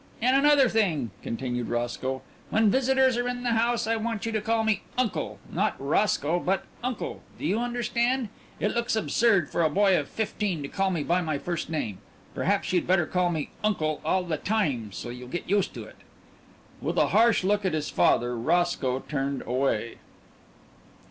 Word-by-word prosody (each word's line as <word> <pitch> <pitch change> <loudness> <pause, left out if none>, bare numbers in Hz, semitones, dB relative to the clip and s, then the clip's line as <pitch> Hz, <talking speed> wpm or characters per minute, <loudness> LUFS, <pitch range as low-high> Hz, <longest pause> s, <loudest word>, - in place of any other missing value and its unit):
"And 255 +3 +3
another 285 -1 +5
thing," 175 - +1
continued 120 0 -3
Roscoe, 120 +2 -2 0.3
"when 220 -2 +3
visitors 265 0 +3
are 245 0 0
in 245 0 -3
the 240 - +1
house 230 0 +1
I 225 +1 +1
want 225 -1 -3
you 225 - -1
to 215 -1 -1
call 225 +1 +1
me 215 -2 +1 0.2
'Uncle' 250 -5 -1
not - - 0
'Roscoe,' 155 +2 +1
but 190 +2 0 0.2
'Uncle,' 250 -2 -3 0.2
do - - -6
you 195 +8 +1
understand? 240 0 0 0.3
It 210 - 0
looks 235 0 0
absurd 220 -6 +2
for - - 0
a 160 - +3
boy 195 +3 +4
of 145 - -4
fifteen 205 -7 -2
to - - -4
call 195 -1 0
me 170 -5 -1
by 175 +4 +1
my 155 -4 -1
first 170 +2 -4
name. 110 - -3 0.3
Perhaps 195 0 0
you'd 180 - +1
better 180 -2 +3
call 180 +1 +1
me 160 -4 -3
'Uncle' 155 -8 0
all 185 -1 +1
the 165 -3 -2
time, 145 - -1
so 120 - -6
you'll 125 +1 -8
get 175 +7 -5
used 200 +1 +1
to - - -6
it." - - -14 0.8
With - - -2
a - - +4
harsh 230 -3 +4
look 205 +2 +1
at 190 - 0
his 155 -1 -2
father, 120 0 +2
Roscoe 135 -1 +1
turned 140 -1 -3
away.... 125 -3 -1
190 Hz, 185 wpm, -27 LUFS, 145-225 Hz, 0.8 s, another